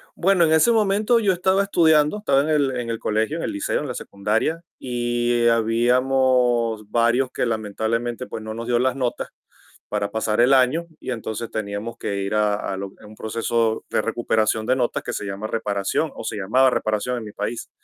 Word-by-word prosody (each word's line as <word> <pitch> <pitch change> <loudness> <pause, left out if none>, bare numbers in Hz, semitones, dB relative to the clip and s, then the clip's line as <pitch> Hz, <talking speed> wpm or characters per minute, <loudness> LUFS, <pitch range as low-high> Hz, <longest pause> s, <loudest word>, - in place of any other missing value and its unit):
Bueno, 185 -1 +3
en 160 - +1
ese 160 +9 +5
momento 215 +1 +3
yo 200 -4 +2
estaba 190 +2 +2
estudiando, 160 -2 +3
estaba 140 -10 +2
en 150 - -2
el 140 -4 +1
en 120 -1 -3
el 115 - -3
colegio, 110 +9 -1
en - - -4
el - - -2
liceo, 300 -1 -1
en 150 - -4
la 125 - -5
secundaria, 110 +11 -1 0.2
y 120 -1 0
habíamos 120 -1 +2
varios 120 +2 +2
que - - -1
lamentablemente, 115 +3 -2
pues 110 - -7
no 110 0 -5
nos 115 +1 -6
dio 120 - +2
las 125 +1 +1
notas 125 -3 -2 0.6
para 105 -1 -2
pasar 110 +1 0
el 130 +3 +5
año, 135 +6 +2
y - - -5
entonces 115 -1 -5
teníamos 105 +2 -4
que 100 - -3
ir 100 - -3
a 105 -1 +2
a 100 -1 -4
lo, 100 +1 -5
eh, - - -15
un 105 +1 -13
proceso 115 +1 -1
de - - +2
recuperación 110 -1 0
de 130 - +2
notas 125 -2 -1
que - - -4
se - - -4
llama 100 +2 -5
reparación, 105 +7 -1
o - - -7
se 110 - -4
llamaba 125 +7 +3
reparación 110 +2 -1
en 115 - -8
mi 105 - -8
país. 120 - -5
120 Hz, 200 wpm, -22 LUFS, 110-135 Hz, 0.6 s, ese